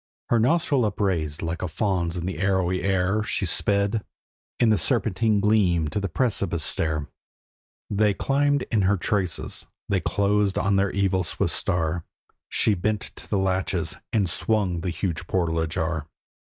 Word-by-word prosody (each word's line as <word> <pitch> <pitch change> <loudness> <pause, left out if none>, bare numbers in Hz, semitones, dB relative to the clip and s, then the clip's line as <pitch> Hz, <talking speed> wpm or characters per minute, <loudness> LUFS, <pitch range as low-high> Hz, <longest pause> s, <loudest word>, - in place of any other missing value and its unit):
Her 120 - +3
nostril 140 +1 +2
upraised, 90 -8 -1
like 80 +1 -3
a 90 - -1
fawn's 90 0 -1
on 85 - -3
the 90 -4 -4
arrowy 95 -2 +1
air, 95 +2 +1
She 105 - -1
sped; 100 +2 +1 0.6
in 115 -2 +4
a - - +2
serpentine 110 -3 +1
gleam 95 -7 +2
to 105 - -2
the 100 -1 -3
precipice 95 -5 0
stair, 75 -2 0 0.8
They 105 0 +2
climbed 145 +2 +1
in 110 - +3
her 100 +2 +3
traces, 95 -2 -1 0.2
they 95 - +1
closed 100 +1 +1
on 100 0 +2
their 100 0 +2
evil 95 -1 +1
swift 85 - -1
star: 85 0 0 0.5
She 110 - +3
bent 105 +2 -1
to - - -10
the 105 - +1
latches, 95 -3 0 0.2
and 105 -5 +2
swung 90 0 0
the 90 - -2
huge 85 -2 -3
portal 85 -3 0
ajar. 80 -1 -2
95 Hz, 155 wpm, -25 LUFS, 85-105 Hz, 0.8 s, in